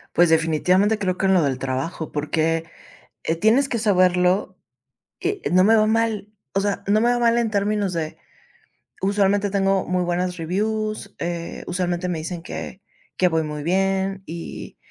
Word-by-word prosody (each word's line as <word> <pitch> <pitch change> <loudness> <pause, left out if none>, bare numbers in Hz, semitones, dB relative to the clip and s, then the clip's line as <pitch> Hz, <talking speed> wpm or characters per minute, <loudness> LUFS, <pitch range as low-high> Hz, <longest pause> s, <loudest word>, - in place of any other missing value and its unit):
Pues 175 -1 +5
definitivamente 180 +6 +3
creo 185 -3 -1
que 195 - +1
en 190 - +4
lo 170 - +4
del 130 -2 -1
trabajo, 135 +5 -3
porque, 160 +2 0 0.6
eh, 165 - 0
tienes 225 +10 +3
que 235 - -1
saberlo, 185 -2 +2 0.7
eh, 405 -2 -2
no 185 +1 +5
me 225 +2 +5
va 215 - +4
mal. 220 -2 0 0.2
O 195 - +2
sea, 200 -1 -2
no 210 +2 +3
me 240 +2 +3
va 245 - +2
mal 235 0 +3
en 230 -2 0
términos 205 -2 0
de, 160 -2 -4 0.8
usualmente 200 +1 +2
tengo 195 -1 +1
muy 180 0 0
buenas 180 +1 -1
reviews, 215 +4 -2
eh, 170 0 -4
usualmente 180 0 -1
me 170 - -2
dicen 165 +2 -5
que 190 +2 -7 0.4
que 180 - +4
voy 160 -2 +1
muy 150 -1 -5
bien 195 +2 0
y 165 +1 -8
185 Hz, 170 wpm, -22 LUFS, 170-205 Hz, 0.8 s, Pues